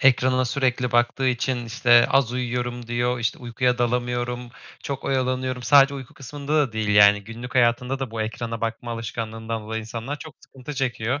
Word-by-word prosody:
ekranına 130 Hz, -1 st, +4 dB
sürekli 125 Hz, -1 st, 0 dB
baktığı 120 Hz, +2 st, +2 dB
için, 125 Hz, 0 st, -1 dB
işte, 120 Hz, +1 st, +5 dB
"Az 130 Hz, -3 st, +3 dB
uyuyorum." 120 Hz, -1 st, -3 dB
diyor, 120 Hz, +1 st, 0 dB
işte, 115 Hz, -3 st, -1 dB
"Uykuya 125 Hz, +1 st, 0 dB
dalamıyorum, 120 Hz, 0 st, -1 dB, 0.4 s
çok 140 Hz, -1 st, -5 dB
oyalanıyorum." 130 Hz, -1 st, -1 dB
Sadece 140 Hz, +1 st, +6 dB
uyku 130 Hz, -3 st, -9 dB
kısmında 145 Hz, +3 st, -5 dB
da 145 Hz, -6 st, +2 dB
değil, 110 Hz, -1 st, -2 dB
yani, 105 Hz, 0 st, +6 dB
günlük 115 Hz, +4 st, -8 dB
hayatında 125 Hz, +2 st, +2 dB
da 135 Hz, -3 st, -4 dB
bu 110 Hz, -1 st, -2 dB
ekrana 115 Hz, +1 st, -4 dB
bakma 115 Hz, +1 st, -3 dB
alışkanlığından 115 Hz, -1 st, -4 dB
dolayı 110 Hz, +1 st, -4 dB
insanlar 115 Hz, +6 st, -6 dB
çok 155 Hz, -, -10 dB
sıkıntı 135 Hz, +2 st, -10 dB
çekiyor. 130 Hz, 0 st, -1 dB
120 Hz, 165 wpm, -24 LUFS, 115-130 Hz, 0.4 s, Sadece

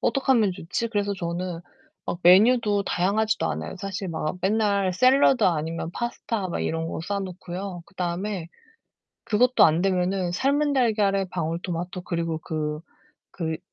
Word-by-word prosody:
어떡하면 255 Hz, -7 st, +2 dB
좋지?' 180 Hz, +7 st, -3 dB
그래서 205 Hz, -2 st, -1 dB
저는 175 Hz, -1 st, -4 dB, 0.5 s
막 170 Hz, -, -3 dB
메뉴도 205 Hz, +3 st, +5 dB
다양하지도 210 Hz, +5 st, +1 dB
않아요. -, -, -4 dB
사실 195 Hz, 0 st, -5 dB
막 160 Hz, 0 st, -3 dB
맨날 200 Hz, -2 st, +1 dB
샐러드 255 Hz, +2 st, +4 dB
아니면 165 Hz, -1 st, -1 dB
파스타 230 Hz, -4 st, -3 dB
막 -, -, -3 dB
이런 165 Hz, 0 st, -2 dB
거 -, -, -4 dB
싸 200 Hz, -1 st, -1 dB
놓고요. 185 Hz, -1 st, -6 dB
그다음에 180 Hz, -1 st, -3 dB, 0.8 s
그것도 250 Hz, +4 st, +4 dB
안되면은 180 Hz, +2 st, +1 dB
삶은 285 Hz, +8 st, +1 dB
달걀에 210 Hz, -7 st, +2 dB
방울토마토 175 Hz, +2 st, -3 dB
그리고 165 Hz, -2 st, -2 dB
그 155 Hz, -2 st, -3 dB, 0.6 s
그 160 Hz, -2 st, -2 dB
185 Hz, 310 characters per minute, -25 LUFS, 170-210 Hz, 0.8 s, 메뉴도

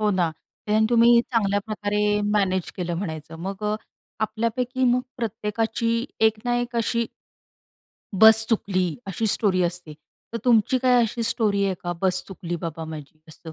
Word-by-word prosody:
हो 210 Hz, -1 st, +2 dB
ना, 180 Hz, -4 st, +1 dB, 0.4 s
ते 215 Hz, +1 st, +3 dB
तुम्ही 235 Hz, 0 st, +6 dB
चांगल्या 205 Hz, -4 st, +1 dB
प्रकारे 210 Hz, -1 st, 0 dB
मॅनेज 190 Hz, -3 st, 0 dB
केलं 175 Hz, -2 st, -3 dB
म्हणायचं 160 Hz, -3 st, -5 dB
मग. 195 Hz, +2 st, -5 dB
अ, 210 Hz, 0 st, 0 dB, 0.4 s
आपल्यापैकी 235 Hz, +4 st, -1 dB
मग 250 Hz, -, +2 dB, 0.2 s
प्रत्येकाची 225 Hz, +1 st, -1 dB, 0.2 s
एक 220 Hz, 0 st, +1 dB
ना 245 Hz, 0 st, +1 dB
एक 240 Hz, 0 st, -3 dB
अशी 230 Hz, 0 st, 0 dB, 1.1 s
बस 220 Hz, +2 st, +7 dB
चुकली, 185 Hz, -6 st, 0 dB
अशी 195 Hz, +4 st, -2 dB
स्टोरी 195 Hz, -3 st, +2 dB
असते. 175 Hz, -3 st, -3 dB, 0.4 s
तर 230 Hz, -, -2 dB
तुमची 245 Hz, +1 st, +3 dB
काय 250 Hz, -1 st, +4 dB
अशी 230 Hz, +1 st, -2 dB
स्टोरी 210 Hz, -3 st, +1 dB
आहे 195 Hz, -1 st, 0 dB
का, 175 Hz, 0 st, -2 dB
बस 185 Hz, -1 st, +2 dB
चुकली 175 Hz, -3 st, -5 dB
बाबा 165 Hz, -1 st, -5 dB
माझी 155 Hz, -1 st, -9 dB
असं, 160 Hz, +1 st, -11 dB
210 Hz, 155 wpm, -24 LUFS, 185-230 Hz, 1.1 s, बस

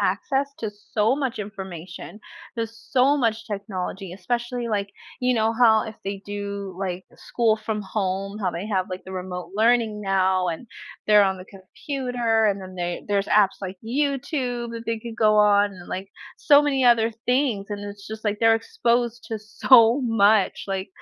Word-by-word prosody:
access 270 Hz, +9 st, 0 dB
to 220 Hz, -, -3 dB
so 210 Hz, +2 st, 0 dB
much 270 Hz, -4 st, -3 dB
information, 190 Hz, -2 st, -8 dB, 0.4 s
there's 230 Hz, 0 st, -4 dB
so 270 Hz, +2 st, +4 dB
much 225 Hz, -3 st, 0 dB
technology, 195 Hz, -3 st, -5 dB
especially, 240 Hz, +5 st, -3 dB
like, 200 Hz, -2 st, -1 dB, 0.3 s
you 250 Hz, 0 st, +2 dB
know, 220 Hz, 0 st, +2 dB
how 225 Hz, -2 st, +5 dB
if 220 Hz, -, -7 dB
they 195 Hz, 0 st, -4 dB
do, 200 Hz, -1 st, -5 dB
like, 185 Hz, -1 st, -3 dB
school 225 Hz, -2 st, 0 dB
from 215 Hz, -1 st, -4 dB
home, 195 Hz, 0 st, -3 dB
how 190 Hz, -4 st, 0 dB
they 175 Hz, +4 st, -5 dB
have, 190 Hz, -4 st, -1 dB
like, 185 Hz, 0 st, -7 dB
the 190 Hz, -, -9 dB
remote 180 Hz, -1 st, -6 dB
learning 225 Hz, -1 st, +2 dB
now 190 Hz, -2 st, +1 dB
and 170 Hz, +8 st, -5 dB, 0.4 s
they're 210 Hz, -1 st, +6 dB
on 190 Hz, -1 st, +1 dB
the 185 Hz, -, -10 dB
computer 230 Hz, +3 st, -2 dB
and 200 Hz, -1 st, 0 dB
then 185 Hz, 0 st, -10 dB
they 175 Hz, -1 st, -4 dB
there's 200 Hz, -1 st, 0 dB
apps 200 Hz, -2 st, +3 dB
like 190 Hz, -1 st, -6 dB
YouTube 255 Hz, -2 st, -2 dB
that 230 Hz, 0 st, -7 dB
they 230 Hz, 0 st, -1 dB
could 225 Hz, 0 st, -8 dB
go 215 Hz, -2 st, +4 dB
on 205 Hz, -1 st, +5 dB
and, 180 Hz, -2 st, -12 dB
like, 190 Hz, +1 st, -5 dB, 0.3 s
so 290 Hz, -1 st, +6 dB
many 270 Hz, -3 st, +1 dB
other 230 Hz, -2 st, +4 dB, 0.2 s
things, 250 Hz, -6 st, +1 dB
and 205 Hz, -1 st, -5 dB
it's 205 Hz, 0 st, -9 dB
just, 220 Hz, 0 st, -8 dB
like, 210 Hz, -1 st, 0 dB
they're 225 Hz, 0 st, +6 dB
exposed 240 Hz, -, -1 dB
to 220 Hz, -, -4 dB
so 230 Hz, +3 st, +5 dB
much, 220 Hz, -4 st, +3 dB
like, 195 Hz, -1 st, -3 dB
215 Hz, 175 wpm, -24 LUFS, 195-235 Hz, 0.4 s, they're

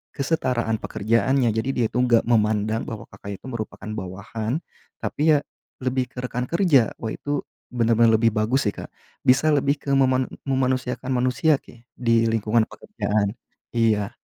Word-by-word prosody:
kesetaraan 125 Hz, -7 st, 0 dB
pekerjaannya, 115 Hz, +5 st, +1 dB
jadi 110 Hz, +4 st, -1 dB
dia 120 Hz, -, +2 dB
tuh 125 Hz, +1 st, +1 dB
enggak 115 Hz, -2 st, +4 dB
memandang 110 Hz, -1 st, +1 dB
bahwa 110 Hz, -2 st, -6 dB
Kakak 100 Hz, -1 st, -8 dB
itu -, -, -13 dB
merupakan 110 Hz, -3 st, -6 dB
bawahan, 110 Hz, -, -4 dB, 0.4 s
tapi 155 Hz, +1 st, +3 dB
ya -, -, +3 dB, 0.4 s
lebih 130 Hz, 0 st, 0 dB
ke -, -, -25 dB
rekan 125 Hz, 0 st, -3 dB
kerja. 165 Hz, -, +4 dB
Wah 110 Hz, -1 st, -4 dB
itu 145 Hz, -1 st, -3 dB, 0.3 s
benar-benar 115 Hz, -1 st, +3 dB
lebih 115 Hz, +1 st, +3 dB
bagus 115 Hz, +5 st, +1 dB
sih 105 Hz, -, +1 dB
Kak. -, -, -8 dB, 0.3 s
Bisa 135 Hz, +5 st, +4 dB
lebih 140 Hz, 0 st, +2 dB
ke 140 Hz, -, -4 dB
meman 130 Hz, -1 st, +3 dB, 0.2 s
memanusiakan 130 Hz, -1 st, 0 dB
manusia 130 Hz, +4 st, +2 dB
ke 120 Hz, 0 st, -18 dB
di 115 Hz, -2 st, +2 dB
lingkungan 115 Hz, 0 st, +2 dB
pekerjaan. 105 Hz, 0 st, -2 dB, 0.4 s
Iya. 110 Hz, -3 st, +2 dB
120 Hz, 150 wpm, -23 LUFS, 110-130 Hz, 0.4 s, enggak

